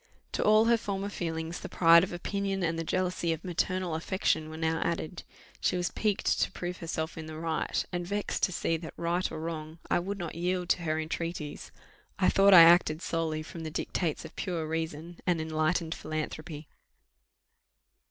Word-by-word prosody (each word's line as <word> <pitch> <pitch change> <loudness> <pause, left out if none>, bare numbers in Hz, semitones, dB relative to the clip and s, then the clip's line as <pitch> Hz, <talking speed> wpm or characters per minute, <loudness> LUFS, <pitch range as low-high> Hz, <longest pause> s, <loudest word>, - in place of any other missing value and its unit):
To - - -1
all 215 +1 +6
her 235 0 +5
former 200 -1 -3
feelings, 165 -3 -4
the - - -7
pride 170 0 +6
of 190 - -3
opinion 195 +2 -2
and 165 -1 0
the - - -1
jealousy 180 0 0
of 160 - -7
maternal 185 0 -1
affection 160 -1 0
were 160 - -7
now 160 0 0
added; 170 0 -3 0.4
she 180 - +1
was 175 -1 -1
piqued 210 -3 0
to - - +1
prove 180 -1 -5
herself 165 -1 -4
in 160 - -7
the 155 0 -7
right, 160 0 -1
and 175 -1 -2
vexed 205 +2 -2
to - - -4
see 165 -1 0
that, 160 0 -9
right 170 +2 0
or - - -5
wrong, 160 -1 -5
I - - +4
would 195 +3 -4
not 170 -4 -5
yield 180 +1 -1
to 175 - +2
her 155 -1 0
entreaties. 160 -1 -4 0.5
I - - +4
thought 195 +1 +5
I 170 - +12
acted 165 -1 +5
solely 160 -2 -1
from 170 - -9
the 160 - -4
dictates 160 +1 -2
of - - -11
pure 170 -4 -2
reason 160 +1 -4
and 175 -2 +2
enlightened 160 +1 0
philanthropy. 155 0 -5
170 Hz, 185 wpm, -29 LUFS, 160-180 Hz, 0.5 s, I